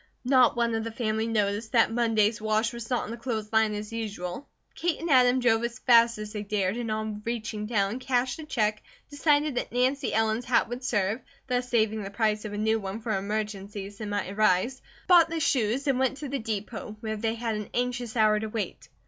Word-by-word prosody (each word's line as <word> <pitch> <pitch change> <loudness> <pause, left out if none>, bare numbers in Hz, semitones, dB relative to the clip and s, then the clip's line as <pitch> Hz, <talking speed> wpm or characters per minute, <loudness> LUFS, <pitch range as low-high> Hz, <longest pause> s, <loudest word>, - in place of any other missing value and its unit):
Not 255 -1 +5
one 235 -1 +1
of 225 0 -1
the 230 - -4
family 220 -1 -1
noticed 210 0 -1
that 230 -2 +4
Monday's 225 -2 +2
wash 215 +2 +1
was 235 -1 -7
not 250 -2 0
on - - -6
the 235 - -5
clothes 225 -3 -4
line 220 -1 +3
as 210 +1 -6
usual. 210 +1 -5 0.3
Kate 345 -1 -1
and 330 -1 -2
Adam 250 -1 +5
drove 230 -2 +3
as 235 0 -3
fast 235 -2 +5
as 210 0 -7
they 210 - -3
dared, 200 -1 -1
and 235 -1 -3
on 215 -1 -3
reaching 220 -2 -3
town, 210 +1 0
cashed 255 -1 0
the 315 - -7
check, 215 -5 0 0.3
decided 295 0 +2
that 245 - -3
Nancy 255 +3 +1
Ellen's 220 +2 +1
hat 245 - +3
would 245 +2 -5
serve, 210 0 0 0.2
thus 250 -1 -1
saving 220 -2 +1
the 195 - -5
price 215 0 0
of 210 - -5
a - - -4
new 220 +1 +1
one 195 +1 -5
for 220 -2 -1
emergencies 200 0 -4
that 215 - -4
might 205 -2 -2
arise, 215 +5 +2 0.2
bought 345 -2 +6
the 330 0 -2
shoes, 255 -3 +1
and 270 -3 +1
went 265 +1 +1
to 290 -1 -6
the 275 0 -2
depot, 215 0 -5
where 220 -1 -3
they 225 +1 -1
had 230 -1 -2
an 210 -1 -5
anxious 245 -1 -2
hour 215 -1 +4
to 220 - -3
wait. 215 -1 -5
225 Hz, 215 wpm, -27 LUFS, 210-245 Hz, 0.3 s, bought